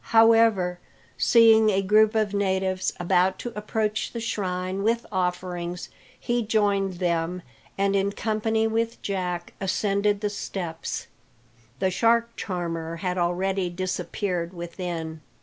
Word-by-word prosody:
However, 225 Hz, -6 st, +4 dB, 0.4 s
seeing 225 Hz, -2 st, +6 dB
a 195 Hz, -1 st, +1 dB
group 215 Hz, +3 st, +4 dB
of 215 Hz, -2 st, +1 dB
natives 190 Hz, -2 st, 0 dB
about 185 Hz, +1 st, +2 dB
to 240 Hz, -, -6 dB
approach 215 Hz, 0 st, -2 dB
the 235 Hz, -, -3 dB
shrine 185 Hz, -4 st, -2 dB
with 230 Hz, +3 st, +1 dB
offerings, 180 Hz, -1 st, -2 dB, 0.3 s
he 240 Hz, -1 st, 0 dB
joined 205 Hz, -3 st, +1 dB
them, 175 Hz, 0 st, -1 dB, 0.3 s
and 200 Hz, 0 st, +2 dB
in 200 Hz, 0 st, +1 dB
company 220 Hz, +1 st, 0 dB
with 225 Hz, +1 st, -1 dB
Jack 180 Hz, -3 st, -3 dB
ascended 200 Hz, +2 st, +1 dB
the 210 Hz, -, 0 dB
steps. 175 Hz, -5 st, -4 dB, 0.7 s
The 190 Hz, +5 st, +1 dB
shark 230 Hz, +4 st, +2 dB
charmer 165 Hz, -3 st, -3 dB
had 180 Hz, +2 st, -2 dB
already 180 Hz, +2 st, 0 dB
disappeared 180 Hz, 0 st, -3 dB
within. 170 Hz, -2 st, -5 dB
190 Hz, 120 wpm, -25 LUFS, 180-215 Hz, 0.7 s, seeing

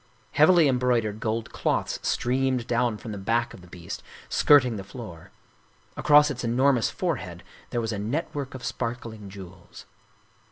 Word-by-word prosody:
Heavily 165 Hz, +2 st, +6 dB
embroi 125 Hz, -3 st, +2 dB
dered 105 Hz, 0 st, -4 dB
gold 110 Hz, 0 st, -2 dB
cloths -, -, -1 dB
streamed 130 Hz, 0 st, 0 dB
down 120 Hz, -2 st, 0 dB
from 110 Hz, -, -8 dB
the 100 Hz, -, -5 dB
back 115 Hz, +4 st, 0 dB
of -, -, -12 dB
the 90 Hz, -, -15 dB
beast, 85 Hz, -1 st, -8 dB, 0.3 s
skirting 130 Hz, -5 st, +5 dB
the 100 Hz, -, -6 dB
floor; 100 Hz, -5 st, -10 dB, 0.7 s
across 150 Hz, 0 st, +5 dB
its 130 Hz, -3 st, -5 dB
enormous 125 Hz, 0 st, +2 dB
forehead -, -, -3 dB, 0.3 s
there 120 Hz, -, -1 dB
was 115 Hz, 0 st, -2 dB
a 105 Hz, -, -3 dB
network 140 Hz, +4 st, -3 dB
of 130 Hz, -, -7 dB
sparkling 115 Hz, -4 st, -5 dB
jewels. 95 Hz, -3 st, -12 dB
120 Hz, 155 wpm, -26 LUFS, 105-130 Hz, 0.7 s, Heavily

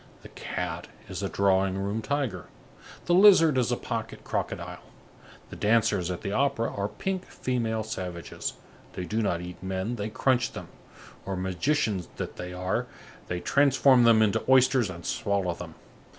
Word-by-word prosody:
The -, -, -11 dB
cat -, -, -5 dB, 0.2 s
is -, -, -5 dB
a -, -, -2 dB
drawing 95 Hz, -1 st, +2 dB
room 100 Hz, +3 st, -2 dB
tiger, 130 Hz, -, -2 dB, 0.6 s
the 175 Hz, -, +2 dB
lizard 180 Hz, -6 st, +7 dB
is 125 Hz, -1 st, +1 dB
a 120 Hz, -, +1 dB
pocket 115 Hz, -1 st, -5 dB
crocodile. -, -, -4 dB, 0.7 s
The -, -, -7 dB
dancers 110 Hz, -5 st, +2 dB
at 90 Hz, -, -4 dB
the 100 Hz, -, -3 dB
opera 115 Hz, -1 st, 0 dB
are 100 Hz, 0 st, -1 dB
pink 190 Hz, -, -3 dB
female 115 Hz, -3 st, -2 dB
savages. 90 Hz, -6 st, -5 dB, 0.4 s
They 90 Hz, -, -4 dB
do 110 Hz, +4 st, -1 dB
not 85 Hz, -5 st, 0 dB
eat 90 Hz, 0 st, -8 dB
men, 95 Hz, +5 st, -3 dB
they 105 Hz, 0 st, -3 dB
crunch 120 Hz, +2 st, +1 dB
them; -, -, -8 dB, 0.5 s
or, 95 Hz, -, -3 dB
magicians 95 Hz, -, -1 dB
that -, -, -6 dB
they 90 Hz, 0 st, -6 dB
are, 90 Hz, +1 st, -2 dB, 0.4 s
they 90 Hz, 0 st, -3 dB
transform 135 Hz, -2 st, +4 dB
them 110 Hz, -1 st, +6 dB
into 105 Hz, -2 st, +1 dB
oysters 130 Hz, -4 st, +5 dB
and 85 Hz, -2 st, -8 dB
swallow 100 Hz, -3 st, 0 dB
them. -, -, -9 dB
110 Hz, 160 wpm, -27 LUFS, 95-125 Hz, 0.7 s, lizard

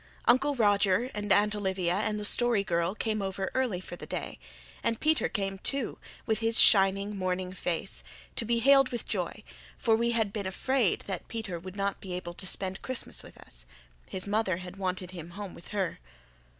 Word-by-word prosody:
Uncle 275 Hz, +4 st, +4 dB
Roger 205 Hz, +1 st, +3 dB
and 205 Hz, -1 st, -3 dB
Aunt 210 Hz, +1 st, +4 dB
Olivia 190 Hz, -4 st, 0 dB
and 210 Hz, +2 st, 0 dB
the 210 Hz, -, -3 dB
Story 235 Hz, -1 st, +4 dB
Girl 170 Hz, +1 st, 0 dB
came 215 Hz, -1 st, -1 dB
over 190 Hz, 0 st, -2 dB
early 250 Hz, -8 st, 0 dB
for 180 Hz, -, -8 dB
the -, -, -9 dB
day; -, -, -4 dB, 0.4 s
and 230 Hz, -, 0 dB
Peter 310 Hz, 0 st, +2 dB
came 195 Hz, -2 st, -2 dB
too, 275 Hz, +2 st, -1 dB, 0.3 s
with 220 Hz, -1 st, +1 dB
his 225 Hz, 0 st, +4 dB
shining, 195 Hz, +1 st, +6 dB
morning 185 Hz, -1 st, -2 dB
face, 165 Hz, -, -2 dB, 0.3 s
to -, -, -1 dB
be 235 Hz, +1 st, +1 dB
hailed 270 Hz, +2 st, +6 dB
with 240 Hz, -, -4 dB
joy, -, -, -3 dB, 0.3 s
for 225 Hz, -3 st, +3 dB
we 235 Hz, +1 st, +1 dB
had 225 Hz, -4 st, +1 dB
been 200 Hz, -3 st, -2 dB
afraid 240 Hz, +2 st, +1 dB
that 190 Hz, -3 st, -5 dB
Peter 215 Hz, -7 st, -4 dB
would 185 Hz, +2 st, -9 dB
not 200 Hz, 0 st, -1 dB
be 185 Hz, -2 st, -6 dB
able 175 Hz, -1 st, -5 dB
to 190 Hz, +2 st, -3 dB
spend 190 Hz, +1 st, -2 dB
Christmas 260 Hz, -2 st, -4 dB
with -, -, -14 dB
us. -, -, -11 dB, 0.4 s
His 185 Hz, -, -2 dB
mother 205 Hz, -3 st, +1 dB
had 180 Hz, +1 st, -9 dB
wanted 185 Hz, -1 st, -2 dB
him 170 Hz, -2 st, -8 dB
home 200 Hz, -3 st, -5 dB
with 170 Hz, -, -12 dB
her. 195 Hz, -4 st, -2 dB
200 Hz, 190 wpm, -29 LUFS, 185-225 Hz, 0.4 s, shining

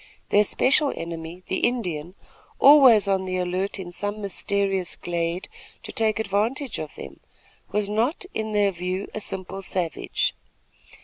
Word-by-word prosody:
Their 205 Hz, -, +5 dB
special 275 Hz, +7 st, +2 dB
enemy, 165 Hz, +1 st, -7 dB
the 190 Hz, -, -1 dB
Indian, 180 Hz, -8 st, -1 dB, 0.4 s
always 265 Hz, -8 st, +7 dB
on 190 Hz, -1 st, +1 dB
the 185 Hz, 0 st, -2 dB
alert 185 Hz, +3 st, -1 dB
in 180 Hz, -2 st, -7 dB
some 205 Hz, +4 st, -2 dB
mysterious 195 Hz, -1 st, 0 dB
glade 170 Hz, +1 st, -3 dB, 0.4 s
to -, -, -7 dB
take 220 Hz, -1 st, +1 dB
advantage 220 Hz, +6 st, -1 dB
of 155 Hz, -1 st, -6 dB
them, 70 Hz, 0 st, -10 dB, 0.5 s
was 210 Hz, 0 st, +1 dB
not, 230 Hz, -, 0 dB
in 220 Hz, 0 st, -3 dB
their 205 Hz, -1 st, +3 dB
view, 185 Hz, +2 st, -4 dB
a -, -, -3 dB
simple 195 Hz, -1 st, -5 dB
savage. 180 Hz, -3 st, -1 dB
195 Hz, 140 wpm, -24 LUFS, 180-215 Hz, 0.5 s, always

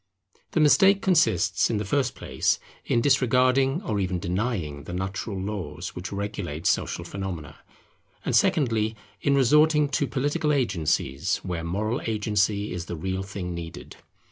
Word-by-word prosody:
The -, -, +2 dB
mistake 190 Hz, +6 st, +5 dB
consists 105 Hz, -, +3 dB
in 115 Hz, -, 0 dB
the 105 Hz, -, -2 dB
first 130 Hz, +3 st, 0 dB
place, -, -, 0 dB, 0.3 s
in 115 Hz, -, +1 dB
disregarding 130 Hz, -, +3 dB
or 105 Hz, -, -1 dB
even 95 Hz, -2 st, -1 dB
denying 85 Hz, -, -2 dB
the 85 Hz, -, -7 dB
natural 95 Hz, +2 st, -3 dB
laws 100 Hz, -1 st, -4 dB
which 90 Hz, +1 st, -6 dB
regulate 100 Hz, +1 st, -4 dB
social -, -, 0 dB
phenomena; 95 Hz, -7 st, -6 dB, 0.7 s
and -, -, +1 dB
secondly, 115 Hz, -6 st, +2 dB, 0.3 s
in 140 Hz, -, +2 dB
resorting 150 Hz, +3 st, +4 dB
to 140 Hz, 0 st, 0 dB
political 145 Hz, +4 st, 0 dB
agencies 85 Hz, -, 0 dB
where 90 Hz, -3 st, -3 dB
moral 105 Hz, +7 st, -1 dB
agency 105 Hz, -2 st, 0 dB
is 85 Hz, -1 st, -4 dB
the 85 Hz, -, -4 dB
real 95 Hz, +4 st, -3 dB
thing 95 Hz, -2 st, -5 dB
needed. 85 Hz, -1 st, -8 dB
105 Hz, 145 wpm, -26 LUFS, 90-135 Hz, 0.7 s, mistake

